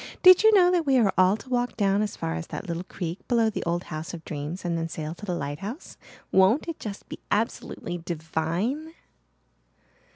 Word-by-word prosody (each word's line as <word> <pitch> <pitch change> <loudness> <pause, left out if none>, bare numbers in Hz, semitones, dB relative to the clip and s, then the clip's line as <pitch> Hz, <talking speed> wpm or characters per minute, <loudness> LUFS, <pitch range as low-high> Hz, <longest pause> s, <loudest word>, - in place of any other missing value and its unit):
Did 370 0 +9
you 440 0 +7
know 360 -2 +6
that 345 -4 +1
we 270 -1 +4
are 215 -6 +3
all 185 +3 +4
to - - -14
walk 245 -2 -1
down 200 -1 +2
as 210 -1 -3
far 80 - -2
as 80 0 -5
that - - -6
little 170 +1 -3
creek 175 -1 -5
below 230 -3 +3
the - - -3
old 170 +1 -1
House 160 +3 -5
of 165 - -11
Dreams 155 +5 -5
and 170 -1 0
then 165 0 -2
sail 155 0 -5
to 210 +4 -10
the 180 - -1
lighthouse? 170 - -6 0.4
Won't 190 - +4
it 335 - -5
just 205 -2 -7
be - - -8
absolutely 205 -4 -2
divine?" 170 - -3
190 Hz, 200 wpm, -26 LUFS, 165-245 Hz, 0.4 s, Did